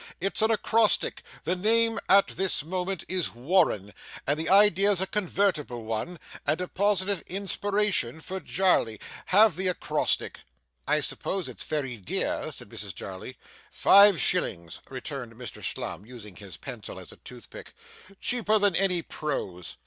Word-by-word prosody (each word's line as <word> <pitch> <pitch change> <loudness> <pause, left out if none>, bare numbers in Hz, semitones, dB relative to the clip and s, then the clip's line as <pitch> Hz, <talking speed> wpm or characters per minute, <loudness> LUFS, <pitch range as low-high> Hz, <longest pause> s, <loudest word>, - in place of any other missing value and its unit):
It's 195 +4 +1
an 220 - +4
acrostic 225 0 +2 0.2
the 180 - 0
name 225 +4 +2
at 195 +1 +6
this 190 -5 +2
moment 185 +2 -3
is 180 -9 0
Warren, 125 - +1 0.3
and 145 +2 0
the 160 - -2
idea's 200 -1 +5
a 190 - +2
convertible 185 - -1
one, 115 +11 -4 0.3
and 155 - +1
a 180 - -3
positive 200 -1 +1
inspiration 200 - 0
for 190 +4 -5
Jarley. 180 - +1 0.3
Have 210 +3 +5
the 185 +1 0
acrostic.' 180 - -1 0.5
'I - - +2
suppose 190 -3 -2
it's - - -7
very 135 -6 -3
dear,' 95 - -2
said - - -6
Mrs - - -5
Jarley. 95 +7 -8 0.3
'Five 200 -2 +6
shillings,' 85 - 0
returned 130 -2 -7
Mr 120 -3 -9
Slum, - - -4
using 105 -4 -12
his 95 -6 -10
pencil - - -7
as - - -9
a - - -14
toothpick. - - -13 0.4
'Cheaper 220 -3 +1
than 205 -3 +2
any 180 -3 +2
prose. 90 - -5
180 Hz, 145 wpm, -27 LUFS, 125-200 Hz, 0.5 s, at